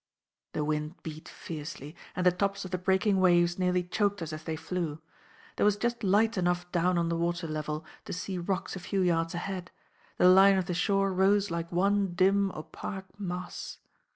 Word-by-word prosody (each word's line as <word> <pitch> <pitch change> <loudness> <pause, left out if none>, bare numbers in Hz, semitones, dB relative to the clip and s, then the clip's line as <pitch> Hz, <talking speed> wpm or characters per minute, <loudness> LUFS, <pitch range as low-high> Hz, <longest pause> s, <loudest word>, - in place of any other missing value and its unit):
The 150 - -1
wind 150 +2 -2
beat 155 -1 -8
fiercely, 150 -1 -7 0.2
and 180 - -1
the 180 - +7
tops 200 +2 -1
of 185 - -8
the 185 - -1
breaking 190 +2 +2
waves 175 -1 +4
nearly 180 -1 +2
choked 200 +1 0
us 160 -1 -5
as 155 +1 -7
they 160 - -2
flew. 165 -1 -3 0.6
There - - +1
was 205 0 +4
just 240 +1 -2
light 210 +2 +3
enough 175 0 0
down 180 0 +2
on 170 0 +1
the 170 - 0
water 170 +1 -1
level 155 0 -4 0.2
to - - -5
see 180 +1 -4
rocks 185 +2 -2
a - - -5
few 190 +2 -1
yards 165 -2 +1
ahead; 180 0 -4 0.5
the 180 - +5
line 190 +1 +7
of 185 - 0
the 180 - -2
shore 195 +2 +1
rose 195 +1 +3
like 170 0 -3
one 195 +1 +1
dim 195 +2 +3
opaque 190 +5 -8
mass. 180 -2 -5
180 Hz, 190 wpm, -29 LUFS, 170-195 Hz, 0.6 s, the